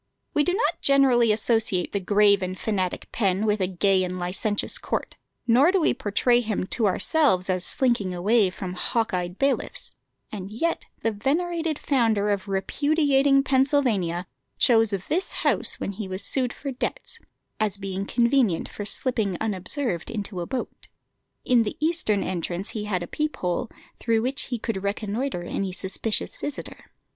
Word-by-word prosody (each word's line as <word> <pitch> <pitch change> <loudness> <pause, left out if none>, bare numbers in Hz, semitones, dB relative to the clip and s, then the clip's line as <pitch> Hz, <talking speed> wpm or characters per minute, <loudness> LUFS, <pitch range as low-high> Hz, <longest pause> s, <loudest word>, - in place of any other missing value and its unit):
We 295 - +3
do 360 +4 +1
not 455 - 0
generally 260 -5 +4
associate 215 -4 +2
the 200 - -1
grave 200 +1 +4
and 185 0 -3
fanatic 190 -4 -2
Penn 195 -1 0
with 210 -1 +1
a 185 - +2
gay 190 +1 +2
and 180 0 -3
licentious 190 +4 -1
court, - - -3 0.3
nor 255 +8 +5
do 385 - +2
we 325 - +3
portray 240 +1 +2
him 215 -5 -2
to 225 -4 +2
ourselves 190 - +3
as 180 -1 -1
slinking 235 -7 +1
away 200 +3 +2
from 185 0 -6
hawk 225 +4 -1
eyed 180 0 -2
bailiffs; 275 0 -1 0.4
and 195 -3 -6
yet 330 +10 -2 0.2
the 225 - +2
venerated 320 +8 -1
founder 225 -6 +1
of 200 0 -2
repudiating 275 +6 +2
Pennsylvania 255 - +1 0.3
chose 225 -2 +4
this 215 - -2
house - - +1
when - - -3
he 200 0 -6
was 185 +1 0
sued 255 -3 0
for 275 +2 -6
debts, 385 - -5 0.4
as 210 -2 0
being 195 0 -4
convenient 235 -7 +2
for 205 - -7
slipping 215 -5 -1
unobserved 210 - -2
into 205 -5 -4
a 170 - -5
boat. 260 -1 -5 0.6
In 245 -2 +4
the 215 - -3
eastern 310 -11 +1
entrance 180 +1 -3
he 210 -2 -4
had 185 -4 -1
a - - -7
peep 305 - -2
hole, 180 +5 -2 0.3
through 225 -1 +1
which 270 +4 +1
he 245 - -3
could 215 -3 -3
reconnoitre 205 +1 -2
any 190 +2 -3
suspicious 190 +4 -2
visitor. 290 -1 -6
215 Hz, 160 wpm, -25 LUFS, 190-260 Hz, 0.6 s, nor